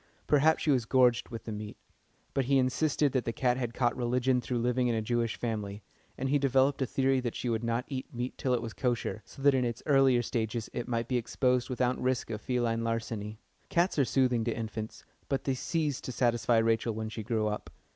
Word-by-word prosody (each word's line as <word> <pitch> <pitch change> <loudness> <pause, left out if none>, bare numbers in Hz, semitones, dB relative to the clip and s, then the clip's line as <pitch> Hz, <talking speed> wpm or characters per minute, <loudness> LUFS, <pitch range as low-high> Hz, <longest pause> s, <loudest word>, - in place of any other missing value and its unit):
Perhaps 155 +2 +3
she 150 - +3
was 125 -4 +2
gorged 125 -1 +3
with 115 -2 -7
the 110 - -6
meat. 105 0 -6 0.6
But 135 - +1
he 135 +2 +3
insisted 140 +2 +2
that 130 -2 0
the - - -2
cat 125 +1 +1
had 120 -3 -3
caught 120 -2 +1
religion 125 +1 +1
through 125 0 -2
living 125 +1 +1
in 120 - +1
a 110 - 0
Jewish 115 0 0
family, 105 -3 -4 0.3
and 135 - -2
he 145 +1 +3
developed 135 +1 +2
a 130 - +1
theory 135 0 +2
that 120 -2 -3
she 125 - -2
would 115 0 -1
not 115 +2 -1
eat 130 -2 -5
meat 125 +1 -4
till 125 -2 0
it 120 - -2
was 115 -2 -5
kosher, 120 -3 -1
so 135 - -12
that 140 -1 +6
in 130 -1 +2
its 120 -1 -3
earlier 135 -4 +4
stages 110 -1 -2
it 120 - -4
might 115 -2 -1
be 125 - +1
exposed 125 +1 0
without 125 0 0
risk 125 -2 0
of 105 -1 -4
feline 120 -2 0
larceny. 110 -2 -3 0.3
Cats 170 -2 +2
are - - +6
soothing 125 -3 +2
to 115 - -1
infants, 110 -1 -5 0.2
but 135 - 0
they 135 - 0
ceased 150 +1 -2
to - - -3
satisfy 120 -1 +2
Rachel 115 0 +2
when 110 0 -3
she 110 - -5
grew 110 0 -1
up. 105 0 -3
120 Hz, 225 wpm, -30 LUFS, 115-130 Hz, 0.6 s, that